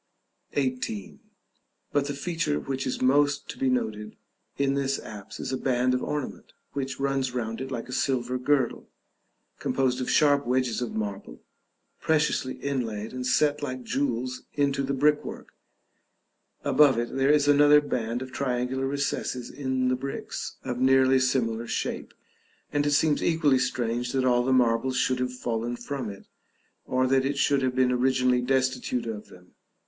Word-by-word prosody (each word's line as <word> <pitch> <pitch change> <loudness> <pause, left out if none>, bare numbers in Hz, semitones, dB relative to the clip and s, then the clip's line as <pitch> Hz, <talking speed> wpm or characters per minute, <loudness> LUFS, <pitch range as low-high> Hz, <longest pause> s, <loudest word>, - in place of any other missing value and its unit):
§ - - -19
XVIII. 130 -6 -3 0.7
But 145 -1 +1
the 145 - -3
feature 160 0 -1
which 135 -1 -3
is 130 - -2
most 145 +2 +3
to - - -6
be 135 - +2
noted 105 -4 -2 0.4
in 140 -1 +2
this 140 0 0
apse 105 -2 -9
is - - -4
a - - 0
band 125 -1 +1
of 125 - 0
ornament, 150 -3 -4 0.2
which 135 -2 -3
runs 135 -2 -1
round 115 -1 -3
it 135 - -4
like 120 -3 -4
a - - -9
silver 125 -1 0
girdle, 130 -1 0 0.7
composed 130 -1 0
of 125 - -2
sharp 145 -3 +3
wedges 125 -2 +1
of 120 - -4
marble, 100 - -5 0.6
preciously 150 -4 +1
inlaid, 115 -6 -3
and 125 0 -3
set 150 +2 +2
like 130 -3 -4
jewels 130 -1 -2
into 140 -1 +1
the 135 0 -1
brickwork; 150 +2 0 1.1
above 145 -5 +5
it 120 0 -2
there 135 +1 +2
is 145 -1 +4
another 145 +1 +7
band 120 -4 -2
of 130 - -10
triangular 130 0 -1
recesses 135 -3 -2
in 130 -2 -1
the 130 - +2
bricks, 135 +2 -5
of 125 -1 -3
nearly 130 0 +5
similar 120 -3 0
shape, - - -3 0.6
and 145 0 +1
it - - +2
seems 150 0 +3
equally 150 -5 +3
strange 120 -1 -1
that 130 -1 +1
all 120 -1 +4
the 130 - 0
marbles 125 0 +2
should 130 0 +1
have 125 0 -1
fallen 120 -1 -3
from 120 0 -5
it, 100 -1 -10 0.6
or 130 0 +1
that 130 0 +3
it 140 +1 -1
should 140 0 +2
have 130 -1 0
been 130 -1 +3
originally 125 0 +2
destitute 130 -1 0
of 110 -2 -5
them. 90 0 -17
130 Hz, 165 wpm, -27 LUFS, 125-140 Hz, 1.1 s, another